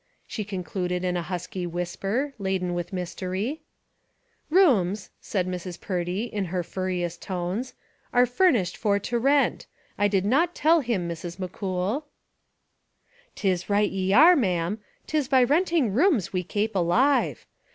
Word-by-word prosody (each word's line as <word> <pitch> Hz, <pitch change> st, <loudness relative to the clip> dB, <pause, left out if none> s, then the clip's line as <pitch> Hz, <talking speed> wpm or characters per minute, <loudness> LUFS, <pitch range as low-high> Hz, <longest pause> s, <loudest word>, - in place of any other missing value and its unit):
she 215 Hz, -, -4 dB
concluded 180 Hz, -2 st, -3 dB
in 180 Hz, -1 st, 0 dB
a 175 Hz, -, 0 dB
husky 180 Hz, +1 st, -4 dB
whisper, 195 Hz, -, -2 dB
laden 190 Hz, -2 st, -1 dB
with 175 Hz, 0 st, -4 dB
mystery. 185 Hz, -, -3 dB, 0.9 s
"Rooms," 220 Hz, -, +3 dB
said 185 Hz, -3 st, -1 dB
Mrs. 180 Hz, -1 st, -5 dB
Purdy, 180 Hz, +2 st, -2 dB
in 210 Hz, -4 st, -3 dB
her 180 Hz, 0 st, -2 dB
furriest 180 Hz, -1 st, -3 dB
tones, 190 Hz, +7 st, -3 dB, 0.4 s
"are 245 Hz, 0 st, +5 dB
furnished 245 Hz, -, +2 dB
for 205 Hz, -3 st, +1 dB
to 235 Hz, +4 st, -2 dB
rent. 275 Hz, +3 st, +2 dB, 0.3 s
I 205 Hz, -, +4 dB
did 195 Hz, -2 st, +1 dB
not 320 Hz, +10 st, +2 dB
tell 325 Hz, +2 st, +4 dB
him, 225 Hz, -9 st, -1 dB
Mrs. 170 Hz, +1 st, -6 dB
McCool." 190 Hz, -, -3 dB, 0.6 s
" 485 Hz, 0 st, -37 dB
'Tis 185 Hz, -2 st, -1 dB
right 205 Hz, 0 st, +2 dB
ye 190 Hz, 0 st, -1 dB
are, 315 Hz, -, +8 dB
ma'am; 185 Hz, -, 0 dB, 0.3 s
'tis 305 Hz, -4 st, 0 dB
by 260 Hz, -2 st, +5 dB
renting 300 Hz, -, +2 dB
rooms 265 Hz, -, +2 dB
we 185 Hz, -, +1 dB
kape 210 Hz, +5 st, -1 dB
alive. 210 Hz, +11 st, +2 dB
195 Hz, 140 wpm, -26 LUFS, 180-250 Hz, 0.9 s, are